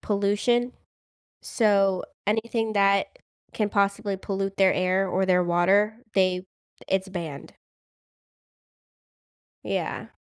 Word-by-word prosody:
pollution, 210 +5 0 0.7
so 195 -4 +2 0.2
anything 225 +1 -1
that 200 -1 +3 0.5
can 210 -2 -1
possibly 200 0 0
pollute 195 0 -4
their 190 -1 +4
air 185 +1 +1
or 190 +1 0
their 180 -1 +3
water, 195 +5 +2 0.2
they 185 -1 +2 0.4
it's 190 0 0
banned. 165 -7 -7 2.1
Yeah. - - -4
195 Hz, 95 wpm, -25 LUFS, 185-210 Hz, 2.1 s, their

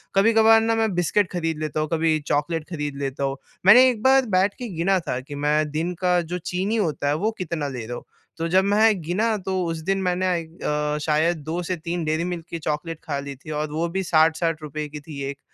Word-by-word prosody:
कभी-कभार 225 +2 +6
ना 225 0 +1
मैं 220 -3 +1
बिस्किट 175 +2 +1
खरीद 165 -3 -2
लेता 155 0 -2
हूँ, 155 - 0
कभी 160 -1 +2
चॉकलेट 155 +2 0
खरीद 150 -4 -4
लेता 140 0 -3
हूँ। 135 0 -1 0.3
मैंने 245 +7 +9
एक 235 -4 -3
बार 265 0 +5
बैठ 190 +2 +3
के 245 - -4
गिना 185 +4 +2
था 125 - -1
कि 145 +3 -9
मैं 150 +1 +1
दिन 165 +4 -2
का 180 -1 +3
जो 170 +1 -4
चीनी 180 +5 -2
होता 155 -10 -1
है 145 - +2
वो 215 +8 0
कितना 165 -4 -3
ले 125 -5 -5
रहा 120 +2 -5
हूँ। - - -10 0.3
तो 165 0 -2
जब 185 +3 +3
में 205 0 +3
गिना 210 +8 0
तो 190 -1 -1
उस 165 -1 -2
दिन 195 0 +1
मैंने 180 0 0
आई 175 -2 0
अ, 150 -2 -2
शायद 155 +3 +2
से - - -11
2 165 +4 -3
से 185 +2 -2
3 170 +1 -4
डेयरी 155 +2 0
मिल्क 175 -2 -4
की 170 - -5
चॉकलेट 155 +1 -3
खा 145 -4 -3
ली 140 0 -6
थी। 145 +4 -10
और 150 0 -2
वो 160 +3 -1
भी 190 +3 -2
60-60 155 -2 +1
की 150 +1 -7
थी 145 -1 -9
1 140 0 -7
165 Hz, 235 wpm, -23 LUFS, 150-185 Hz, 0.3 s, मैंने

